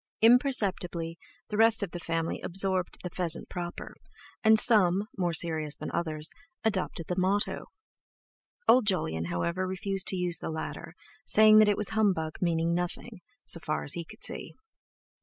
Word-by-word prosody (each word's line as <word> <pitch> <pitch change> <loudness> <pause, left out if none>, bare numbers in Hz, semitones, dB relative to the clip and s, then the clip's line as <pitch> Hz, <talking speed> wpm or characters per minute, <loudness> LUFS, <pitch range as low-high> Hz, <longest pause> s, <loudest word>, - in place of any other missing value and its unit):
Imperceptibly 195 - +2 0.3
the 210 - -3
rest 225 -1 +4
of 190 - -4
the 175 - -6
family 165 -1 -3
absorbed 190 0 0
the 180 - -4
"pheasant 170 -2 -1
proper," 175 -1 -6 0.5
and 220 0 +6
some, 205 -3 +4
more 180 -3 0
serious 160 -2 -1
than - - -6
others, 155 -2 0 0.3
adopted 190 -5 -2
the 180 - -3
motto; 195 +3 0 1.0
old 245 -3 +5
Jolyon, 80 - 0
however, 170 - -2
refused 190 +1 -3
to - - 0
use 175 -2 -1
the - - -5
latter, 160 +1 -6 0.3
saying 215 0 +6
that 215 -1 +6
it 205 - +1
was 210 - +1
humbug 190 -8 0
meaning 170 -1 +1
nothing, 180 +4 -4 0.2
so 170 - 0
far 155 -1 -3
as 145 - 0
he 170 - -3
could 165 - -14
see. - - -5
180 Hz, 160 wpm, -28 LUFS, 165-205 Hz, 1.0 s, and